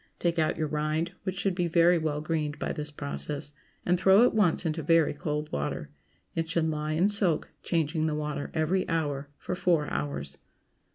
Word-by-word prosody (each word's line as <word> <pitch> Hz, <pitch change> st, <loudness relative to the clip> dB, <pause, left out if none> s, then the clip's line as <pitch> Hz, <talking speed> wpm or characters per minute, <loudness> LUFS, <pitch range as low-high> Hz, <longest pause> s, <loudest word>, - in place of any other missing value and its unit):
Take 170 Hz, -1 st, 0 dB
out 155 Hz, -, +1 dB
your 155 Hz, -, 0 dB
rind, 155 Hz, +3 st, -1 dB
which 190 Hz, -2 st, -4 dB
should 195 Hz, +1 st, +1 dB
be 175 Hz, -1 st, 0 dB, 0.3 s
well 150 Hz, -2 st, -1 dB
greened 155 Hz, -1 st, -2 dB
by -, -, -2 dB
this 150 Hz, -2 st, -4 dB
process, 140 Hz, -, -4 dB, 0.3 s
and 180 Hz, 0 st, +2 dB
throw 195 Hz, +4 st, +6 dB
at 245 Hz, -, +4 dB
once 185 Hz, -5 st, +2 dB
into 160 Hz, 0 st, -1 dB
very 165 Hz, +1 st, +3 dB
cold 150 Hz, 0 st, -3 dB
water. 75 Hz, +1 st, -3 dB, 0.4 s
It 165 Hz, 0 st, -2 dB
should 165 Hz, -1 st, +1 dB
lie 155 Hz, 0 st, -2 dB
in 170 Hz, +5 st, +3 dB
soak, 200 Hz, -6 st, +1 dB
changing 160 Hz, -1 st, 0 dB
the 155 Hz, -, -1 dB
water 150 Hz, -1 st, -3 dB
every 170 Hz, +4 st, +1 dB
hour, 145 Hz, -4 st, -1 dB
for -, -, -4 dB
four 170 Hz, -4 st, +2 dB
hours. 70 Hz, 0 st, -3 dB
155 Hz, 180 wpm, -28 LUFS, 150-170 Hz, 0.4 s, throw